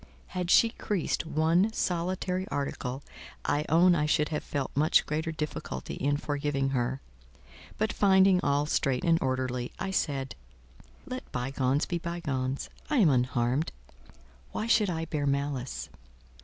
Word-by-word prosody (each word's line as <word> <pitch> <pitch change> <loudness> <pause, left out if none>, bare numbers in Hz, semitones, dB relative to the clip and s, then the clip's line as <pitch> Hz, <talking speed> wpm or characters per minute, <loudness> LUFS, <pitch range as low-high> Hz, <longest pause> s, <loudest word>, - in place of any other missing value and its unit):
Had 180 -2 -3
she 230 - +6
creased 190 -7 -2
one 165 +7 +2
solitary 185 0 -1
article, 135 -1 -3 0.4
I 150 +1 +1
own 175 +3 +6
I 150 -3 +1
should 150 0 +2
have 150 - -2
felt 140 -2 -3
much 155 +3 +4
greater 160 +2 -2
difficulty 150 - -5
in 145 +1 0
forgiving 145 -2 -1
her; 130 0 -1 0.8
but 215 0 0
finding 190 -2 +5
all 145 -2 +2
straight 135 -4 0
and 165 -1 +3
orderly, 130 -1 -1
I 190 0 -3
said, 135 -7 -1 0.7
"Let 255 0 -7
bygones 130 +2 0
be 175 - -2
bygones. 140 -6 -3 0.2
I 300 - +1
am 195 -10 +6
unharmed: 125 +2 +1 0.8
why 215 - -2
should 225 -3 +3
I 165 -2 -2
bear 150 -3 -2
malice?" 140 -2 -2
150 Hz, 140 wpm, -29 LUFS, 135-175 Hz, 0.8 s, she